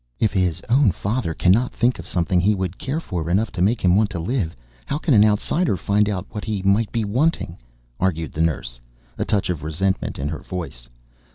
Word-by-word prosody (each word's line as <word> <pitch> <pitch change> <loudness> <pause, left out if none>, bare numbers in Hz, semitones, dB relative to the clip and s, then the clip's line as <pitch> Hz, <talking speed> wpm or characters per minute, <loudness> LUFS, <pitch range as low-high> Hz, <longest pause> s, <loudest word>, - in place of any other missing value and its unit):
"If 110 -2 +2
his 90 -5 0
own 125 0 +4
father 100 -2 -2
cannot 110 +7 +3
think 125 -3 +1
of 85 - -8
something 90 +1 +1
he 105 +3 +3
would 95 -1 -4
care 140 +4 -2
for 85 - -4
enough 100 +5 +1
to 90 - -4
make 110 +6 +2
him 90 -1 +4
want 105 0 +3
to 95 -5 -5
live, 90 -2 -2 0.3
how 145 - -1
can 155 -1 +1
an 105 -2 +7
outsider 105 - +1
find 105 +2 +1
out 95 -2 -2
what 105 - -5
he 105 -4 -3
might 100 +3 +2
be 115 -2 0
wanting?" 120 - 0 0.4
argued 80 -5 0
the 80 - -3
nurse, 70 -7 -1 0.4
a - - 0
touch 100 -3 0
of 80 -4 -4
resentment 95 +5 -1
in 70 - -2
her 80 - -4
voice. 80 -10 -7
95 Hz, 210 wpm, -22 LUFS, 85-110 Hz, 0.4 s, an